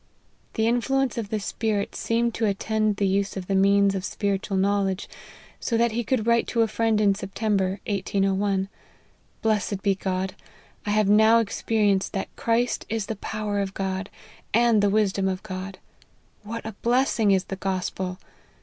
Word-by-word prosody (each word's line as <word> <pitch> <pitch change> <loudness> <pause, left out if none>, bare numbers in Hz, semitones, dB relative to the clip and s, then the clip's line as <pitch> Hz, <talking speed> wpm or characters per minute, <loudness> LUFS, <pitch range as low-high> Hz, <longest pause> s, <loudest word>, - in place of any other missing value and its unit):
The 220 - +1
influence 255 +2 +1
of 210 -3 -4
the 215 - -1
Spirit 210 0 -2
seemed 235 0 0
to 225 - 0
at 200 -1 0
tend 215 -1 0
the 200 - 0
use 195 +1 0
of 185 - -4
the 195 - -2
means 200 +1 +4
of 190 -2 -3
spiritual 200 -1 -1
knowledge, 195 0 +1 0.5
so 230 - 0
that 235 0 +3
he 235 +2 -1
could 230 -1 0
write 235 0 +3
to 230 -1 +2
a - - +1
friend 225 -1 +1
in 205 -2 +4
September 195 -1 -1
1801, 195 -1 0 0.4
" - - -37
blessed 210 -3 0
be 200 - +3
God, 190 0 -2 0.5
I - - 0
have 210 -1 +3
now 220 +2 +6
experienced 210 -3 +1
that 195 - -4
Christ 235 +1 0
is 225 -2 -1
the 225 - -4
power 210 0 -3
of 195 -1 -3
God, 190 0 -3 0.5
and 235 -2 +4
the 205 - +3
wisdom 200 -2 +1
of 185 0 -2
God. 190 -1 -6 0.6
What 225 +2 -6
a 220 - -4
blessing 240 -3 +2
is 190 -2 +3
the 195 - -5
gospel 185 -1 -3
205 Hz, 175 wpm, -25 LUFS, 195-225 Hz, 0.6 s, now